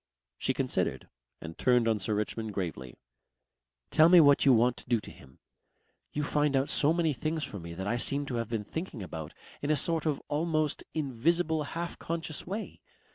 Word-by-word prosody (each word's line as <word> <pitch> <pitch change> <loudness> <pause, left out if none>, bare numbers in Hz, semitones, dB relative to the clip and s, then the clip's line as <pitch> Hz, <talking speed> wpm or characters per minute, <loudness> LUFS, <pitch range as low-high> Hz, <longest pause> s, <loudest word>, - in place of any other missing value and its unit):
She - - 0
considered - - -1 0.3
and 80 0 -8
turned 125 -2 +3
on 110 -2 +2
Sir 105 +2 -1
Richmond 105 0 -3
gravely. 80 -10 -4 1.0
"Tell 160 +1 +6
me 180 0 +9
what 145 -3 +6
you - - +8
want 120 0 +4
to - - -11
do 120 -2 +3
to - - -11
him. 65 -1 -17 0.7
You 150 - -2
find 145 -1 +1
out 135 +1 +1
so 145 - +4
many 165 -2 +1
things 155 +3 -2
for 100 - -5
me 85 0 -8
that 95 +2 -5
I 120 +4 0
seem 140 +3 -1
to 130 - -4
have 115 -2 -3
been 115 -3 -2
thinking 150 - -5
about 80 -4 -7 0.3
in 145 - -2
a 155 - +4
sort 160 +2 0
of 150 -3 0
almost 155 0 0
invisible 160 +4 +1 0.2
half 170 0 -4
conscious 165 -2 -4
way. 205 +4 -5
140 Hz, 190 wpm, -30 LUFS, 110-160 Hz, 1.0 s, me